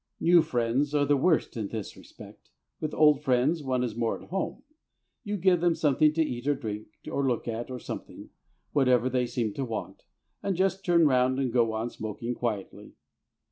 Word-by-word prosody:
New 170 0 +6
friends 135 0 0
are 145 -1 +3
the 145 - +3
worst 160 +2 +1
in 110 -3 -3
this 110 -1 -6
respect. - - -14 0.3
With 155 -1 -3
old 150 -2 +4
friends 135 +4 +2
one 130 -3 -1
is 115 -3 -3
more 115 -1 -1
at - - -15
home; 195 - -3 0.6
you 205 -2 -3
give 180 -2 +3
them 175 -1 +3
something 150 0 +3
to 165 +1 +2
eat 125 -3 -5
or 145 - +3
drink, 110 -5 -6 0.2
or 140 -1 0
look 120 -2 -1
at, 115 +1 -4
or 130 - -5
something - - -8 0.4
whatever 130 -3 +3
they 125 -1 +1
seem 120 -3 -2
to 135 - -3
want 115 -4 -5 0.4
and 195 - -1
just 190 +1 +1
turn 170 -2 +4
round 130 -2 +3
and 130 -4 -1
go 115 -3 +2
on 115 +2 -3
smoking 110 +3 -5
quietly. 110 -5 -4
130 Hz, 190 wpm, -28 LUFS, 120-155 Hz, 0.6 s, New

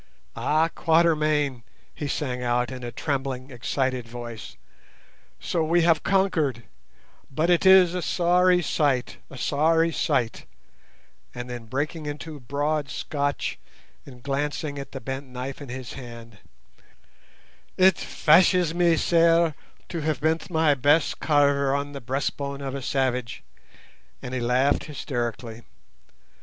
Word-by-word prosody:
"Ah, 155 +2 +2
Quatermain!" 155 -6 +2 0.3
he 145 - -5
sang 130 -4 -3
out 125 0 0
in 130 -1 -7
a 120 - -5
trembling, 135 0 -3
excited 130 0 -2
voice, 120 -2 -8 0.8
"so 165 -2 -1
we 170 +2 +2
have 165 -2 +3
conquered; 160 - +1 0.7
but 155 +6 0
it 175 +2 +3
is 185 -2 +7
a 180 - -2
sorry 180 +1 +3
sight, 140 -4 0
a 135 - -10
sorry 160 +5 +2
sight;" 130 -8 -1 0.9
and 120 0 -6
then 120 -2 -7
breaking 150 +5 -3
into 150 +1 -6
broad 145 +3 -2
Scotch 145 +2 -3 0.4
and 125 -3 -14
glancing 145 +1 -2
at 140 - -8
the 135 - -6
bent 135 +3 -6
knife 130 +3 -7
in 140 - -9
his 125 -2 -7
hand, 115 -4 -11 1.4
"It 190 0 +6
fashes 175 +1 +3
me 170 -1 +3
sair 165 -1 +3 0.4
to 170 - -4
have 150 -2 -1
bent 160 +4 0
my 160 -3 +3
best 145 +3 +2
carver 140 -2 +2
on 140 0 -3
the 140 -1 -7
breastbone 140 +2 -3
of 135 -1 -4
a 140 - -4
savage," 125 - -2 0.8
and 125 - -7
he 130 - -1
laughed 125 +4 +1
hysterically. 120 -5 -4
140 Hz, 130 wpm, -25 LUFS, 125-160 Hz, 1.4 s, is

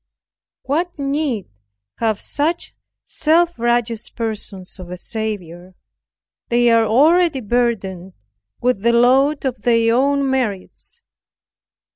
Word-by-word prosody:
What 340 +5 -2
need 275 - -1 0.5
have 220 -3 0
such 320 +4 -2 0.3
self 335 0 +1
righteous 235 -1 0
persons 210 -5 -4
of 180 -1 -9
a 180 - -6
Saviour? 185 -4 -6 0.7
they 240 0 +3
are 230 -1 +4
already 310 +6 +4
burdened 200 -6 -1 0.5
with 250 -5 0
the 235 +2 +3
load 265 +5 +3
of 250 -4 -2
their 230 0 +3
own 280 +2 +2
merits. 260 - -3
235 Hz, 105 wpm, -19 LUFS, 215-280 Hz, 0.7 s, are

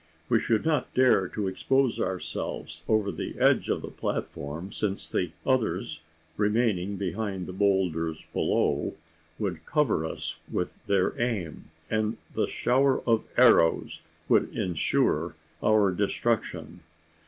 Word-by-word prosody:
We - - +4
should 110 -2 +1
not 150 -5 +1
dare 125 -7 +4
to 100 +2 -3
expose 130 +7 +1
ourselves 95 -1 -4
over 110 -2 +2
the 80 - -5
edge - - +3
of - - 0
the - - -5
platform: 80 +7 -4
since 100 -2 -2
the 90 -3 -1
others, 130 -10 0 0.4
remaining 105 -3 +1
behind 95 0 -3
the 90 - -7
boulders 90 -5 0
below, - - +1 0.4
would 90 -7 -3
cover 150 - +2
us 80 - -5
with - - -2
their 100 -2 +2
aim; 105 -10 -2 0.2
and 110 +2 0 0.2
the - - 0
shower 130 +2 +2
of 115 -2 +2
arrows 115 -9 +4 0.3
would - - +3
insure 90 -4 +1 0.3
our 105 -3 +4
destruction. 90 - -1
100 Hz, 125 wpm, -27 LUFS, 90-115 Hz, 0.4 s, We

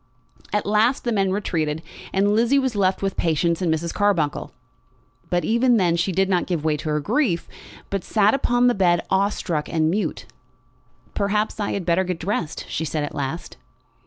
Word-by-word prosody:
At 210 - 0
last 215 +5 +2
the 240 - -1
men 195 -3 +1
retreated, 160 -6 -1 0.3
and 200 +2 +2
Lizzie 235 +5 +3
was 260 -4 0
left 190 -1 +1
with 195 -1 -1
Patience 170 +1 +1
and 175 -3 +1
Mrs. 165 +1 -2
Carbuncle. 195 -8 0 0.8
But 175 0 0
even 235 +1 +3
then 175 -4 +2
she 170 +3 0
did 190 +2 +2
not 185 -2 +1
give 165 -4 -2
way 155 -1 +2
to 155 - -5
her 150 0 +1
grief, 205 - 0 0.4
but 195 -2 -2
sat 210 -1 +3
upon 245 -2 +2
the 245 - +5
bed 175 -4 +2
awe 195 +1 +3
struck 165 -7 -3
and 160 -1 +1
mute. 205 +4 -2 0.9
"Perhaps 210 +2 -1
I 205 - -1
had 195 -3 -3
better 175 +2 +2
get 180 -2 -3
dressed," 175 -3 -3
she 160 - -3
said 155 -1 -2
at 145 - -5
last. 145 +4 -5
190 Hz, 190 wpm, -23 LUFS, 165-210 Hz, 0.9 s, the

